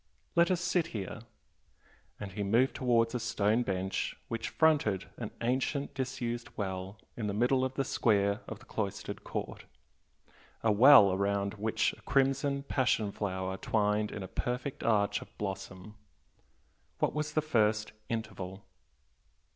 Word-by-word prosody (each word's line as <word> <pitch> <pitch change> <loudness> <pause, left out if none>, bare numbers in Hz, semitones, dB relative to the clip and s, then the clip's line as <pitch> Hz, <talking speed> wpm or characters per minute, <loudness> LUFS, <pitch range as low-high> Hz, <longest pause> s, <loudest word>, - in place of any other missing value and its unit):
Let 170 0 +5
us 180 -2 +1
sit 175 -1 +1
here" 100 +3 -5 1.0
and 100 -2 -6
he 105 - -5
moved 115 +6 +3
towards 115 -2 +2
a 125 - -1
stone 110 0 +1
bench 95 -3 -2
which 115 -1 -3
fronted 145 - +2
an 115 -3 -4
ancient 130 +4 -1
disused 125 -3 -3
well 95 0 -4 0.2
in 110 -3 -3
the 100 - -2
middle 130 +3 +2
square 100 -3 +2
of - - -6
the - - -17
cloistered 100 -3 -4
court, - - -5 1.0
a 110 - +4
well 105 -3 +8
round 100 0 0
which 110 +1 0
a - - -15
crimson 135 +1 +1
passion 120 -7 +1
flower 95 -2 -3
twined 105 0 +1
in 100 - -5
a - - -6
perfect 125 +7 -3
arch 105 -3 +2
of - - -14
blossom 95 0 -6 1.0
"What - - +1
was 150 0 -2
the 155 - +2
first 110 -7 +1 0.2
'interval'?" 100 -4 -5
110 Hz, 140 wpm, -31 LUFS, 100-130 Hz, 1.0 s, well